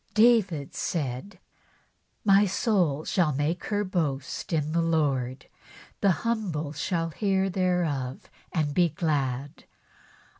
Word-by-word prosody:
David 215 - +3
said: 140 +3 -3 0.4
'' - - -41 0.3
My 200 0 +6
soul 180 - +1
shall 175 -5 +2
make 150 +5 -1
her 205 -1 0
boast 155 -9 -2
in 155 -2 0
the 170 +1 +2
Lord; 140 -6 0 0.5
the 200 - +3 0.2
humble 180 -11 -1
shall 165 +2 -1
hear 195 +1 +1
thereof 170 -9 -1 0.2
and 150 -4 0
be 175 +2 +3
glad." 145 -5 -2
165 Hz, 115 wpm, -27 LUFS, 145-190 Hz, 0.5 s, My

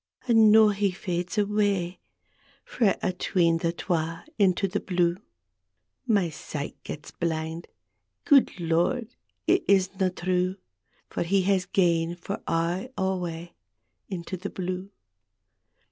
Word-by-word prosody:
And 225 -3 +6
noo 220 0 +7
he 200 0 +1
fades 180 0 -4
awa' 205 -3 +1 0.7
Frae 215 -6 +2 0.2
'tween 170 -3 +2
the 165 0 0
twa 165 -1 -2
— - - -42
into 190 +1 +2
the 180 - -2
blue. 175 -2 +1 0.9
My 200 -7 +2
sight 150 -1 -6
gats 150 - -8
blind; 160 0 -3 0.6
gude 285 -4 +6
Ix>rd, 175 +9 0 0.3
it - - +3
isna 190 -1 +3
true 180 +1 -1 0.6
That 170 - -1
he 195 +1 +3
has 190 -1 +1
gane 170 -2 +2
for 180 +3 -6
aye 175 +7 0
awa 175 -3 -2 0.6
Into 185 -1 -5
the 195 +3 -5
blue! 185 +1 -4
180 Hz, 120 wpm, -26 LUFS, 170-200 Hz, 0.9 s, noo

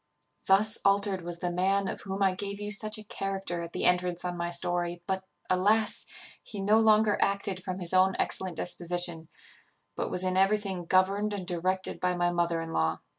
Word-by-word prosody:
"Thus 210 +3 +4
altered 200 -1 +2
was 170 0 -3
the 175 - -1
man 190 +2 +1
of - - -5
whom 195 0 -3
I 190 -1 +3
gave 200 +1 -5
you 205 0 -4
such 215 +1 +1
a 215 - -8
character 195 -4 -4
at 170 0 -7
the - - -2
entrance 180 0 +1
on 180 0 -2
my 170 0 -3
story; 175 0 -1
but, 190 -1 -2 0.2
alas! 210 +4 +2 0.3
he 205 - -8
no 210 +3 +4
longer 215 -1 +4
acted 200 -2 0
from 185 -1 -4
his 180 -1 +1
own 185 +1 +4
excellent 185 -2 -1
disposition, 175 -2 -1 0.7
but - - -3
was 180 - -1
in 185 0 0
everything 195 -2 +1
governed 195 +4 +2
and 195 -3 -4
directed 185 +1 -2
by 180 0 0
my 175 0 +1
mother 170 -1 0
in 165 0 -7
law. 80 0 0
185 Hz, 190 wpm, -29 LUFS, 175-200 Hz, 0.7 s, Thus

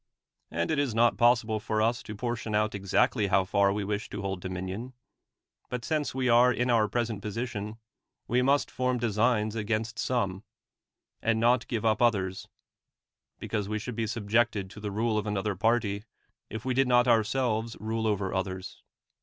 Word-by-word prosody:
And 85 +1 -1
it 155 - +1
is 135 -6 0
not 120 0 +4
possible 115 -2 +3
for 110 +1 -2
us 115 +3 +1
to 105 - -8
portion 115 -1 -3
out 105 0 +1
exactly 100 +2 +1
how 95 0 +3
far 100 +1 +3
we 105 +1 -2
wish 105 +1 -3
to - - -5
hold 95 -2 -3
dominion; 95 +7 -5 0.8
'lit 125 -1 -4
since 155 -2 -1
vre 130 -1 0
are 120 +1 +6
in 125 0 0
our 110 -2 +4
present 115 -1 -2
position, 105 0 -4 0.5
we 125 +2 +2
must 140 +3 +2
form 125 0 0
designs 110 -1 +1
against 110 +1 -2
some, 100 -6 -1 0.8
and 115 0 +1
not 120 +1 +3
give 115 -2 -2
up 110 0 +2
others; 95 -6 +1 0.9
because 105 -3 -3
we 110 - -1
should 110 +2 -5
be 115 -1 -1
subjected 110 -2 0
to 105 - -10
the 105 0 -4
rule 110 +2 0
of 105 - -5
anoth(^r 105 -2 -2
party, 110 -2 +1 0.4
if 110 +2 -6
we 130 - +1
did 135 +1 +3
not 125 0 +4
ourselves 115 0 +1
rule 110 +1 -2
over 100 -3 -1
others. 95 0 -4
110 Hz, 175 wpm, -28 LUFS, 100-120 Hz, 0.9 s, are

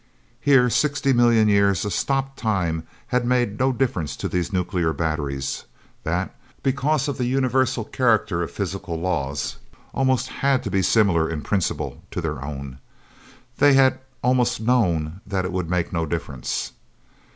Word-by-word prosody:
Here, 135 -3 +5
sixty 140 -1 +2
million 120 -3 +4
years 100 -2 +3
of 105 - -2
stopped 135 0 -1
time 85 -7 -1 0.2
had 125 0 +1
made 120 -4 +1
no 130 +1 +3
difference 115 - -1
to - - -3
these 90 +3 -2
nuclear 90 -3 0
batteries, 75 -5 -2 0.4
that, 90 +3 -2 0.3
because 140 +2 +1
of 140 - -3
the 125 - +1
universal 130 -2 +1
character 110 -7 +1
of 85 - -2
physical 95 -2 -4
laws, 75 -6 -2 0.4
almost 130 -2 +1
had 135 -2 +1
to - - -4
be 95 - +2
similar 95 -4 +3
in 80 -2 -3
principle 100 -4 -2
to - - -4
their 75 -4 -3
own. 70 -2 -7 0.8
They 145 -1 +6
had 135 -1 +4 0.2
almost 125 -1 +2
known 95 -8 +1
that 95 -2 -1
it 90 - -3
would 90 -2 -2
make 90 -1 -1
no 85 -2 0
difference. 70 -5 -3
100 Hz, 150 wpm, -23 LUFS, 85-125 Hz, 0.8 s, They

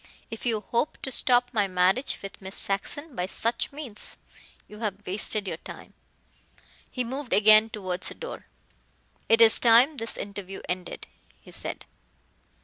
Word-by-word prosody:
"If 225 +2 -5
you 220 -3 0
hope 235 +8 -1
to 265 - -3
stop 245 -1 +3
my 205 -3 +2
marriage 185 +8 +1
with 195 - -8
Miss 190 +1 -7
Saxon 270 +9 -2
by 180 -3 -2
such 230 +4 -1
means, 275 -7 -4 0.5
you 210 - -12
have 205 -2 -4
wasted 205 +2 -1
your 165 - -3
time," - - -11 1.0
he 250 - -2
moved 260 +2 -4
again 215 +1 +7
towards 185 -4 -3
the - - -5
door. 485 - -8 0.8
"It 225 0 +5
is 225 -1 +7
time 245 +6 +6
this 225 -1 -3
interview 200 -1 -7
ended," 180 0 -4 0.3
he - - -16
said. - - -6
220 Hz, 150 wpm, -26 LUFS, 195-245 Hz, 1.0 s, again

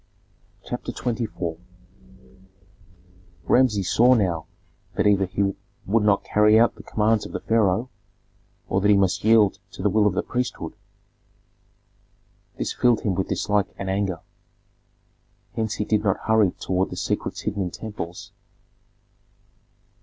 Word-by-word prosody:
CHAPTER - - -5
XXIV 110 -9 -3 1.8
Rameses 110 -7 +2
saw 125 +2 +6
now 90 -8 0 0.5
that - - +1
either 100 -2 +3
he 100 +1 0 0.3
would 110 +3 +2
not 105 -1 +2
carry 105 +1 +4
out 120 - +4
the - - -13
commands 110 0 +1
of - - -13
the - - -2
pharaoh 110 0 +1 0.8
or 95 - 0
that 105 - +2
he 105 - +6
must 95 -2 +1
yield 110 -2 +4
to - - -7
the 105 - +2
will 105 +1 +3
of 95 - 0
the - - 0
priesthood; 125 -10 -3 1.8
this - - -2
filled 120 -3 +2
him 100 - 0
with 95 +1 -2
dislike 105 -1 0
and 95 -1 -3
anger. 95 -4 -1 1.3
Hence 110 -2 -2
he 105 - -2
did 105 0 +1
not 95 -3 +1
hurry 110 -3 +3
toward 95 0 -1
the - - -7
secrets - - -3
hidden 100 - -3
in 90 - -1
temples. 90 -3 -7
105 Hz, 140 wpm, -24 LUFS, 95-110 Hz, 1.8 s, saw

